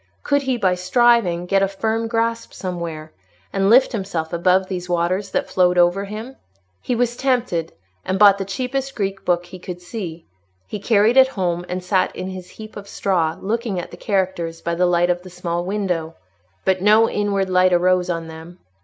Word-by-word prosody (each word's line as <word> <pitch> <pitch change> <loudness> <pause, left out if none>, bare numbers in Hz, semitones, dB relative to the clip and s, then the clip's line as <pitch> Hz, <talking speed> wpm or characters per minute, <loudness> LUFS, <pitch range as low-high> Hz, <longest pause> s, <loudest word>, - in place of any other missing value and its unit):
Could 285 0 +2
he, 265 -2 -1
by 190 -5 +2
striving, 185 -1 +2
get 195 +2 +2
a 195 - +3
firm 220 +3 -2
grasp 230 0 -1
somewhere, 170 -4 -5 0.4
and 195 0 +2
lift 255 +4 +6
himself 190 -7 -3
above 185 +2 +3
these 180 -1 -5
waters 175 +3 0
that - - -1
flowed 180 -1 +2
over 175 +3 +3
him? 220 +6 -8 0.4
He 250 - -1
was 240 0 0
tempted, 245 -12 0 0.3
and 185 +1 -1
bought 200 -1 +6
the - - -1
cheapest 260 +7 -3
Greek 195 -2 -3
book 175 0 +1
he 180 +1 -11
could 180 0 -7
see. 175 -3 -7 0.4
He 210 - -6
carried 215 +3 +3
it 265 0 +8
home 180 -7 -2
and 180 0 -3
sat 185 0 0
on 185 - -4
his 185 -1 -8
heap 215 +2 -11
of 200 -1 -9
straw, 170 -5 0
looking 220 -1 -2
at 175 - -7
the - - -8
characters 180 -4 -1
by 170 - -3
the 180 +1 +2
light 175 0 +3
of 175 0 -2
the 185 - -11
small 175 -1 -3
window; 180 -5 -2 0.5
but 185 -1 +2
no 215 +3 +5
inward 200 -2 0
light 185 0 +3
arose 180 +1 +2
on 165 -1 -3
them. 160 +2 -11
185 Hz, 190 wpm, -21 LUFS, 175-215 Hz, 0.5 s, it